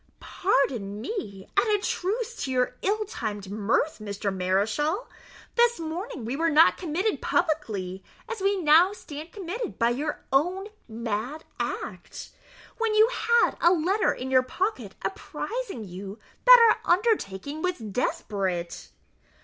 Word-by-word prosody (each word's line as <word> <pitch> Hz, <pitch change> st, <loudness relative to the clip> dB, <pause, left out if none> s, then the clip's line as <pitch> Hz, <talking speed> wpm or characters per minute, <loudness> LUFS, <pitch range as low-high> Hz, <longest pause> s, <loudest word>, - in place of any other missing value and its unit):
"Pardon 245 Hz, -, 0 dB
me, 210 Hz, -, -5 dB
and 400 Hz, +3 st, +3 dB
a 420 Hz, -, +4 dB
truce 435 Hz, +4 st, -2 dB
to -, -, -3 dB
your 250 Hz, -1 st, +1 dB
ill 425 Hz, +2 st, 0 dB
timed 210 Hz, -, -5 dB
mirth, 215 Hz, +9 st, 0 dB
Mr. 200 Hz, -1 st, -3 dB
Mareschal; 215 Hz, -, 0 dB, 0.5 s
this 475 Hz, -2 st, +3 dB
morning 325 Hz, -, -5 dB
we 240 Hz, +4 st, -2 dB
were 330 Hz, +3 st, +1 dB
not 315 Hz, +1 st, +6 dB
committed 370 Hz, +5 st, -1 dB
publicly, 215 Hz, -, -1 dB, 0.2 s
as 455 Hz, -3 st, -5 dB
we 395 Hz, 0 st, +2 dB
now 335 Hz, +4 st, +5 dB
stand 310 Hz, -4 st, -9 dB
committed 410 Hz, +4 st, -5 dB
by 235 Hz, +1 st, +3 dB
your 295 Hz, +4 st, -3 dB
own 365 Hz, +9 st, +1 dB, 0.2 s
mad 230 Hz, +6 st, -4 dB, 0.2 s
act, -, -, -5 dB, 0.5 s
when 455 Hz, -2 st, +1 dB
you 435 Hz, +2 st, +6 dB
had 470 Hz, -1 st, +3 dB
a 340 Hz, -, +6 dB
letter 370 Hz, +5 st, +2 dB
in 260 Hz, +1 st, -5 dB
your 260 Hz, -1 st, +6 dB
pocket 385 Hz, -, -3 dB
apprizing 465 Hz, -, -4 dB
you 195 Hz, +2 st, -8 dB, 0.3 s
that 485 Hz, -3 st, +8 dB
our -, -, +1 dB
undertaking 315 Hz, -, 0 dB
was 365 Hz, 0 st, -1 dB
desperate." 195 Hz, -5 st, -3 dB
310 Hz, 135 wpm, -26 LUFS, -, 0.5 s, that